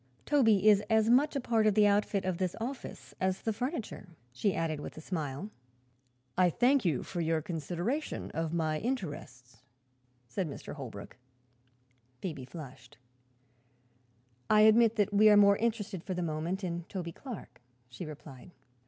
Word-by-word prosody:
Toby 225 -9 +4
is 205 -2 +7
as 220 0 +4
much 280 +5 +4
a - - +1
part 225 -4 +2
of 210 - +3
the 210 -1 +6
outfit 205 -1 +2
of 185 -2 -2
this 185 -2 -1
office 250 +3 -6
as 185 0 0
the 220 - 0
furniture," 245 - -4 0.2
she 190 +10 0
added 160 -2 -1
with - - -8
a - - -5
smile. 160 +2 -4 0.8
"I 180 -1 +4
thank 250 - +3
you 160 -8 0
for 175 - -4
your 165 0 +1
consideration 175 - -3
of 160 0 -2
my 160 -2 0
interests," 145 - -5 0.7
said 155 +8 -3
Mr. - - -8
Holbrook. 125 -9 -9 1.0
Phoebe 145 -5 -5
flushed. 130 -4 -11 1.5
"I 215 0 +6
admit 220 +1 +6
that 205 -2 +1
we 215 +1 +6
are 210 - +7
more 200 -1 +6
interested, 215 -6 -2
for 185 - -4
the 180 - -2
moment, 165 +5 -3
in 170 -2 -3
Toby 175 -3 -4
Clark," 235 - -9 0.3
she 125 +8 -8
replied. 150 -2 -10
185 Hz, 155 wpm, -31 LUFS, 160-215 Hz, 1.5 s, is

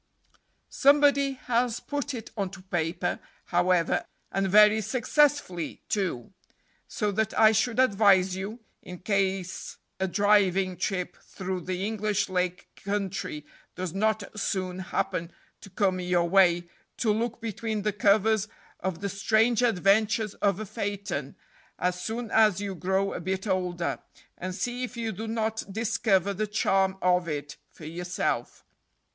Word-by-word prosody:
Somebody 280 -1 +4
has 245 -2 0
put 285 -1 -4
it 225 -2 -8
onto 195 -3 -4
paper, 175 -1 -2 0.3
however, 175 -1 +2 0.3
and 195 +1 0
very 210 +2 +6
successfully, 250 - +1
too; 185 - -2 0.5
so 210 -2 -1
that 220 +2 -1
I 220 -1 +7
should 220 +2 +1
advise 195 -6 +4
you, 205 +5 -6 0.2
in 180 - -9
case 190 -1 -2 0.2
a 190 - +1
driving 195 -1 +3
trip 180 0 -3
through 185 -1 -5
the 185 +2 -3
English 210 -2 -1
Lake 180 -1 -1 0.2
Country 195 -6 -3 0.3
does 180 -2 -4
not 215 +1 +1 0.2
soon 185 -2 -2
happen 170 -2 -2 0.3
to - - -13
come 190 -1 0
your 180 -1 +1
way, 175 -2 +4 0.3
to 220 -3 +2
look 230 +2 -2
between 220 -2 -3
the 210 0 0
covers 210 +1 +3 0.3
of 185 -2 -3
"The 200 - -2
Strange 220 +4 +2
Adventures 215 0 +2
of 200 -1 0
a 215 - -4
Phaeton," 195 -9 -4 0.4
as 180 0 -1
soon 225 0 -4
as 215 -4 +4
you 200 -1 -3
grow 190 +2 0
a - - -4
bit 190 +3 -3
older, 180 -3 -1 0.4
and 185 0 -5
see 245 +4 -3
if 250 -1 -6
you 225 -1 -2
do 220 +3 -6
not 220 0 -1
discover 205 -3 +1
the 215 +2 -2
charm 195 -2 +1
of 180 -1 +3
it 145 -1 -5
for 155 - -13
yourself. 175 +3 -3
195 Hz, 140 wpm, -27 LUFS, 180-220 Hz, 0.5 s, I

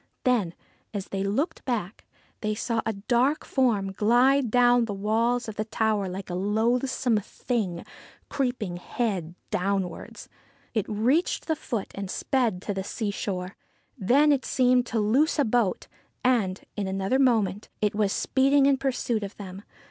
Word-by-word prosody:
Then, 225 -10 +1 0.4
as 195 -2 -4
they 195 0 -2
looked 280 - -1
back, 225 -6 -3 0.3
they 215 -1 -1
saw 230 +1 -1
a 225 - 0
dark 245 +8 +1
form 220 -8 +1
glide 245 +6 +3
down 245 0 +4
the 205 -3 -4
walls 230 +4 +1
of 220 - -7
the 215 - -1
tower 215 -3 0
like 190 +1 -6
a - - -3
loathsome 225 +5 +1
thing 200 -4 -3 0.4
creeping 245 -9 -2
head 180 -4 -3 0.2
downwards. 190 -1 -2 0.5
It 215 -4 -1
reached 245 - +1
the 320 - 0
foot 235 -9 -4
and 195 -1 -5
sped 225 -8 0
to 205 - -2
the 190 -1 -3
seashore. 200 -3 -3 0.4
Then 275 +7 +4
it 275 -2 +2
seemed 250 -1 +2
to 230 - -1
loose 250 +11 +2
a 290 - +3
boat, 225 -4 0 0.4
and, 220 -7 +1
in 205 -2 -2
another 195 +7 0
moment, 220 -7 +2
it 210 -1 +1
was 205 -1 +1
speeding 275 +4 +3
in 275 -1 +4
pursuit 255 -4 -1
of 200 -1 -7
them. 195 -1 -8
220 Hz, 155 wpm, -26 LUFS, 195-250 Hz, 0.5 s, down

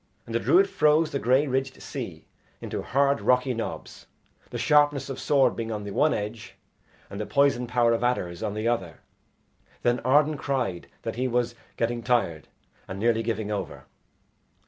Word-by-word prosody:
And - - -8
the - - +2
druid 385 +3 +4
froze 155 - +3
the 140 - -1
grey 130 +4 +3
ridged 135 -1 -2
sea - - -7 0.3
into - - -4
hard 140 -3 +1
rocky 125 +4 +2
knobs, 115 -1 -6 0.4
the 120 - -5
sharpness 145 +2 +3
of 135 - -6
sword 135 -4 +3
being 115 -1 -4
on 105 -1 -4
the 100 - -6
one 150 +8 +3
edge 105 +2 -4 0.5
and 100 - -6
the - - -3
poison 140 -3 +2
power 120 -1 +3
of 115 - -1
adders 90 -9 -1
on 105 -2 -3
the 110 +2 -2
other. 95 -9 -2 0.8
Then 120 0 +2
Arden 150 +3 +3
cried 125 -12 -2 0.2
that - - -4
he 130 +1 0
was 120 -1 0 0.2
getting 120 +1 -1
tired, 110 - 0 0.4
and 95 - -6
nearly 115 +1 +2
giving 110 -2 -2
over. 105 - -5
120 Hz, 170 wpm, -26 LUFS, 110-140 Hz, 0.8 s, druid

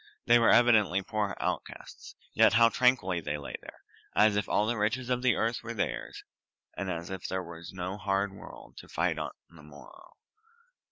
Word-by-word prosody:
They 120 0 +6
were 115 - +4
evidently 105 -6 +4
poor 105 -1 -2
outcasts, - - -5 0.2
yet - - +5
how 115 0 +6
tranquilly 115 -9 +2
they 75 -1 -3
lay 70 - -8
there, - - -13 0.3
as 105 -1 +4
if 105 - -1
all 105 - +2
the 120 +2 0
riches 120 +4 -1
of 125 0 0
the 130 -1 +3
earth 115 +1 -1
were 115 0 -7
theirs, 105 - -4 0.5
and 100 - -4
as 85 0 -5
if 95 -2 -5
there 95 0 -3
was 85 -1 -10
no 95 +1 -5
hard 100 0 -1
world 100 - -13
to - - -12
fight - - -1
on - - -3 0.2
the 85 -2 -17
morrow. 75 -1 -15
100 Hz, 185 wpm, -29 LUFS, 90-115 Hz, 0.5 s, They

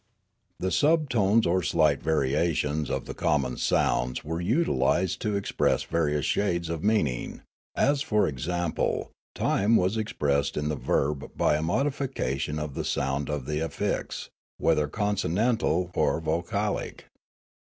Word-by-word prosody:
The 95 - -1
subtones 125 -9 +3
or 90 +2 +2
slight 75 -3 +2
variations 75 0 0
of - - -2
the - - -6
common 65 -4 0
sounds 60 +1 +1
were 80 +2 -3
utilised 95 - +1
to 105 -2 -1
express 100 - +1
various 75 -3 0
shades 85 -5 0
of 80 -1 -4
mean 105 -4 +3
ing; 60 -3 -5 0.3
as 140 0 +2
for 105 -6 +2
example, 85 +5 -2 0.2
time 105 +4 +2
was 95 +2 +2
expressed 70 -9 0
in 75 0 -1
the 75 - -1
verb 70 +1 -1
by 75 - +3
a 75 - -1
modification 90 - -1
of 75 -2 -4
the - - -3
sound 70 +2 -1
of 75 -3 -3
the 75 +2 -2
affix, 80 - -3 0.3
whether 75 -1 +2
con 105 +5 -1
sonantal 90 -3 0
or - - +2
vocalic. 85 +6 -2
85 Hz, 140 wpm, -27 LUFS, 75-105 Hz, 0.3 s, subtones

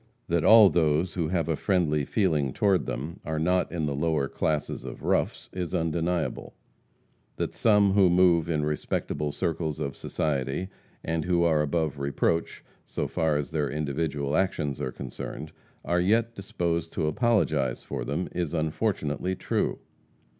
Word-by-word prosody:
That 85 -1 +2
all 110 0 +8
those 80 +1 +2
who 85 -4 -1
have 85 -2 0
a 80 - +1
friendly 75 -6 +1
feeling 75 - +1
toward 100 +1 +2
them 75 +7 -4
are 80 -1 -3
not 90 +3 +1
in 80 -3 -2
the 75 - -1
lower 75 -1 0
classes 75 +1 -2
of - - -8
roughs, - - 0
is 90 -3 -3
undeniable; 85 +1 -1 0.8
that - - -3
some 105 -3 +4
who 95 -2 +5
move 85 -2 +4
in 75 -2 0
respectable 75 0 -2
circles 80 -1 -2
of 70 - -3
society, 70 +4 -2 0.3
and 80 -1 -1
who 90 -1 +2
are 80 -3 +3
above 75 -2 -1
reproach, 70 +4 -1 0.2
so - - -2
far 80 -2 +1
as 75 - -4
their 75 -3 0
individual 75 -1 -2
actions 80 -7 0
are 65 - -2
concerned, 70 +4 -7 0.3
are 90 0 +1
yet 115 +5 +2
disposed 85 -5 -2
to - - -1
apologize 75 - +1
for 65 -4 -4
them, 75 +8 -2
is 85 -2 -2
unfortunately 80 +1 -1
true. - - -1
80 Hz, 155 wpm, -27 LUFS, 75-90 Hz, 0.8 s, all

